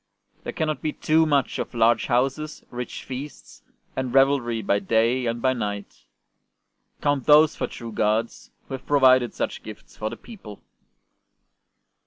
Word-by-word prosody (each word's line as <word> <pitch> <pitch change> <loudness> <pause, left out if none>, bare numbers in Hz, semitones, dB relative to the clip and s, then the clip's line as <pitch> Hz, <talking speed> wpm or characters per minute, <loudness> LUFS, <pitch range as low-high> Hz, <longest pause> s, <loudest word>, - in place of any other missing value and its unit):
There - - -4
cannot 155 -3 -2
be 155 - -2
too 160 +1 +2
much 140 -3 +1
of - - -5
large 115 0 +3
houses, 135 +5 -1
rich 125 0 -6
feasts, 135 +2 -9 0.3
and 130 -1 -2
revelry 135 -4 +2
by 100 +1 +2
day 115 +5 +1
and 115 0 -3
by 130 0 +3
night. 100 - -5 1.0
Count 145 -3 0
those 150 +1 +6
for - - -2
true 115 -2 -8
gods 110 +2 -1 0.2
who - - -8
have 130 - -7
provided 130 -4 +4
such - - -3
gifts - - -12
for 110 - -3
the - - -8
people." 190 - -12
130 Hz, 150 wpm, -24 LUFS, 115-145 Hz, 1.0 s, those